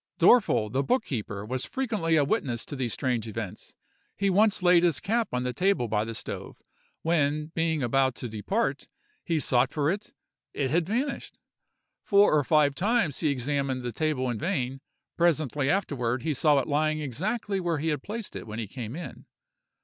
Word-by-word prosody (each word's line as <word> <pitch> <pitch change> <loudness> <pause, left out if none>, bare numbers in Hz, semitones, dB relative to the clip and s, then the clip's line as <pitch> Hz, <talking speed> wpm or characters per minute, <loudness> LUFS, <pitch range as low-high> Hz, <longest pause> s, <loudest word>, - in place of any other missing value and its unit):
"Dorfel, 110 - +4
the 135 - +1
book 250 - +1
keeper, 105 -5 -4
was 130 +3 -2
frequently 215 -11 -1
a 150 - +4
witness 135 - -1
to 145 - -7
these 130 -4 -2
strange 115 +2 -1
events. 110 -2 -7 0.4
He 200 -1 +1
once 205 0 +3
laid 175 -1 +6
his 170 -5 +2
cap 230 +2 0
on 125 0 -1
the 125 0 -2
table 185 -4 +1
by 105 0 0
the 115 0 -5
stove; - - -6 0.4
when, 155 -1 +1
being 160 -3 0
about 130 +1 +2
to 125 - -5
depart, 115 - -2 0.4
he 165 -3 0
sought 130 -1 +2
for 150 +1 +1
it, 205 +2 -5 0.4
it 135 -2 -1
had 165 +1 +1
vanished. 255 +7 -2 0.7
Four 200 -3 +5
or 150 -1 +4
five 150 0 +3
times 200 - +1
he 160 - +1
examined 135 -1 -1
the 120 - -3
table 155 -5 0
in 120 -3 -2
vain; 135 - -2 0.4
presently 150 -5 +1
afterward 130 -10 0
he 155 -1 0
saw 145 +1 +3
it 135 - 0
lying 155 +1 +1
exactly 195 - -2
where 170 -3 -1
he 160 +3 -1
had 150 -3 -1
placed 220 +4 -6
it - - -7
when 105 0 -6
he 115 - -3
came 120 +2 -6
in. 165 -6 -8
145 Hz, 185 wpm, -27 LUFS, 125-175 Hz, 0.7 s, laid